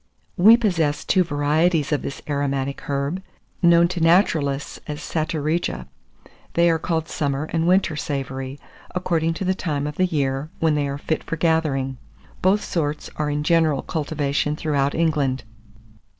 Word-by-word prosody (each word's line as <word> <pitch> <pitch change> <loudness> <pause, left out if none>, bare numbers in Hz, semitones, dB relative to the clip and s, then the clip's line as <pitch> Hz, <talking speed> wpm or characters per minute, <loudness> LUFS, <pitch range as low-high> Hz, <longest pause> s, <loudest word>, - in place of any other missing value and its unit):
We 220 +6 +7
possess 165 -10 0
two 185 - +3
varieties 155 +1 +1
of 150 - +1
this 135 - -6
aromatic 140 -2 -2
herb, 140 +6 -1 0.4
known 170 -1 +6
to 180 - -3
naturalists 160 -5 +2
as 150 0 -4
Satureja. 155 - -2 0.7
They 170 0 +5
are 165 - +1
called 160 -1 -1
summer 140 -2 -1
and 165 0 +1
winter 185 -3 +3
savory, 135 -2 -4 0.4
according 165 -2 0
to 190 - -3
the 185 - +2
time 150 -6 -2
of 150 0 -5
the 185 - +3
year 140 -3 -1
when 160 -1 +2
they 145 -1 0
are 140 0 -3
fit 160 +2 -2
for - - -3
gathering. 150 -6 0 0.4
Both 195 +3 +3
sorts 150 -3 -2
are 150 -1 -1
in 145 0 -1
general 160 -3 +2
cultivation 150 -2 -1
throughout 145 -3 0
England. 145 -6 +1
155 Hz, 150 wpm, -22 LUFS, 140-170 Hz, 0.7 s, We